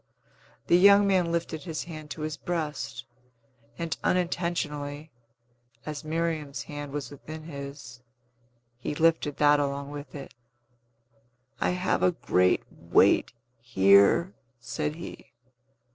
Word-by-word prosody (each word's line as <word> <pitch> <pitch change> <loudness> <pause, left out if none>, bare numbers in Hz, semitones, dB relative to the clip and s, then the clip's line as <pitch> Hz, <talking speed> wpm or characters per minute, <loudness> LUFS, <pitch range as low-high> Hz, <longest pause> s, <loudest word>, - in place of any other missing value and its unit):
The 175 - +5
young 200 +1 +7
man 185 -4 +2
lifted 170 -2 -2
his 160 -3 -4
hand 155 -3 -9
to 155 - -7
his 155 -1 -3
breast, 150 -10 -4 0.7
and, 165 -1 -2
unintentionally, 160 -4 -1 0.7
as 150 0 -5
Miriam's 155 -4 -2
hand 145 -1 -7
was 145 -1 -5
within 155 +2 -9
his, 140 -5 -9 0.8
he 150 - -4
lifted 160 -2 +2
that 145 0 +5
along 140 0 -2
with 145 0 -8
it. 140 -2 -8 1.3
"I - - +1
have 185 +1 0
a 180 - +3
great 90 - +2
weight - - +3 0.3
here!" 100 - +4 0.3
said 150 +5 -3
he. 170 - -10
150 Hz, 115 wpm, -27 LUFS, 140-170 Hz, 1.3 s, young